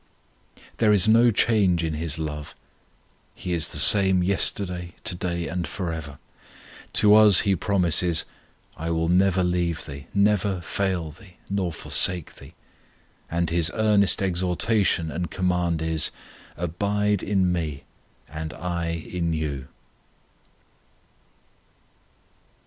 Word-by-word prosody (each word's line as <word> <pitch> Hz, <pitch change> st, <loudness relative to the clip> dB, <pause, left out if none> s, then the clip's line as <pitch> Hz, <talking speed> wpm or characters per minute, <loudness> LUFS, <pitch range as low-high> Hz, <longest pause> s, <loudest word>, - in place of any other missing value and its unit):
There 110 Hz, -2 st, +2 dB
is 105 Hz, -1 st, +4 dB
no 115 Hz, +2 st, +4 dB
change 100 Hz, -6 st, +1 dB
in 80 Hz, -1 st, -3 dB
His 80 Hz, -1 st, -4 dB
love; 75 Hz, -2 st, -7 dB, 0.8 s
He 90 Hz, -, -5 dB
is 80 Hz, -3 st, +1 dB
the -, -, -6 dB
same 95 Hz, -3 st, +7 dB
yesterday, 90 Hz, -2 st, -1 dB
to -, -, -1 dB
day, 85 Hz, -1 st, -4 dB
and 85 Hz, 0 st, -4 dB
for 85 Hz, +3 st, -5 dB
ever. 75 Hz, -3 st, -8 dB, 0.8 s
To 105 Hz, -1 st, +5 dB
us 105 Hz, -3 st, +8 dB
He 100 Hz, -2 st, 0 dB
promises, 90 Hz, -3 st, +1 dB, 0.5 s
"I 80 Hz, +1 st, -6 dB
will 80 Hz, 0 st, -1 dB
never 95 Hz, +1 st, +2 dB
leave 90 Hz, -3 st, -2 dB
thee, 70 Hz, -1 st, -10 dB
never 100 Hz, -2 st, 0 dB
fail 90 Hz, -3 st, -3 dB
thee, 90 Hz, +3 st, -17 dB
nor 95 Hz, -3 st, -2 dB
forsake 90 Hz, +1 st, +2 dB
thee"; -, -, -16 dB, 0.7 s
and 85 Hz, -1 st, -2 dB
His 85 Hz, -1 st, +3 dB
earnest 105 Hz, -3 st, +2 dB
exhortation 90 Hz, -1 st, 0 dB
and 85 Hz, +2 st, -5 dB
command 90 Hz, -3 st, -2 dB
is, 80 Hz, -2 st, +1 dB, 0.5 s
"Abide 100 Hz, +4 st, -2 dB
in 95 Hz, -3 st, 0 dB
Me, 75 Hz, -5 st, -4 dB, 0.4 s
and 80 Hz, 0 st, -7 dB
I 85 Hz, 0 st, -4 dB
in 85 Hz, 0 st, -4 dB
you." 70 Hz, -4 st, -5 dB
90 Hz, 120 wpm, -23 LUFS, 80-100 Hz, 0.8 s, us